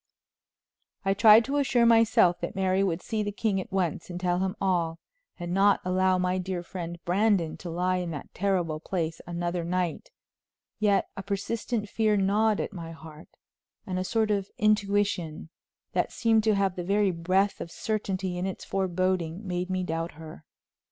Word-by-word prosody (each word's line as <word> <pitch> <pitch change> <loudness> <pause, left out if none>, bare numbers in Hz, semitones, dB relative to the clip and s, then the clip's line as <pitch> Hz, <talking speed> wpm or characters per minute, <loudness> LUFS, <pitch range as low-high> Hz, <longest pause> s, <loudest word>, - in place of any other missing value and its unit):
I 195 - +3
tried 220 +2 +7
to 280 +2 -1
assure 250 -4 +3
myself 225 -6 +5
that - - -4
Mary 190 0 +2
would 180 -2 -1
see 220 -1 -2
the 205 0 -2
king 200 -2 0
at 215 - -11
once 180 -3 -1
and 175 0 -5
tell 180 -1 0
him 190 0 -1
all, 170 -4 0 0.4
and 175 -1 -4
not 200 +1 +4
allow 185 0 +2
my 180 0 0
dear 185 -1 -3
friend 175 -1 -6
Brandon 185 -3 +2
to 175 - -7
lie 180 +2 0
in 180 -1 -3
that 150 -4 -7
terrible 180 -5 0
place 165 -1 -3
another 175 0 -2
night; 175 -1 -2 0.7
yet 205 -2 +2
a - - -5
persistent 210 +3 -3
fear 215 0 +1
gnawed 205 +2 +2
at - - -3
my 165 -3 -7
heart, 160 -1 -12 0.6
and 185 -1 -2
a - - -1
sort 220 +2 +1
of 200 -1 -1
intuition, 205 -6 +1 0.4
that - - 0
seemed 225 -2 +2
to 215 -2 +4
have 195 -2 +1
the 180 - -4
very 200 +1 +2
breath 185 +4 0
of - - -5
certainty 190 -2 -3
in 185 - -1
its 190 - -6
foreboding, 185 -1 -1
made 180 0 -2
me 185 0 -1
doubt 165 0 -3
her. 160 0 -11
185 Hz, 175 wpm, -27 LUFS, 175-205 Hz, 0.7 s, tried